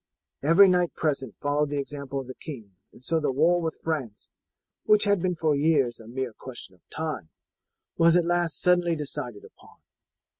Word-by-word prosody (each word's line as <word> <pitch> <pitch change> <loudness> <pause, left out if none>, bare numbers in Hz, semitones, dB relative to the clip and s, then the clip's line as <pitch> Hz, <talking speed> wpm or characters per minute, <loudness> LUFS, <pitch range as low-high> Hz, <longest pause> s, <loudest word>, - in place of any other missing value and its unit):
Every 170 +7 +7
knight 180 -2 +2
present 135 - -2
followed 145 +1 0
the 145 - -2
example 140 -1 -4
of 135 - -6
the 130 - -8
king, 115 -10 -10 0.2
and 125 - -18
so 165 0 +1
the 150 - 0
war 165 +6 +3
with 160 -1 -3
France, 140 -10 -4 0.6
which 210 -1 +5
had 205 -3 +2
been 180 0 0
for 155 -2 +1
years 140 -5 +2
a 110 - -13
mere 125 0 -4
question 120 -5 -9
of 90 - -25
time, 155 - -4 0.7
was 165 0 +5
at 175 -1 +4
last 175 -2 0
suddenly 175 -1 +3
decided 125 -7 -6
upon. - - -19
150 Hz, 180 wpm, -26 LUFS, 130-170 Hz, 0.7 s, Every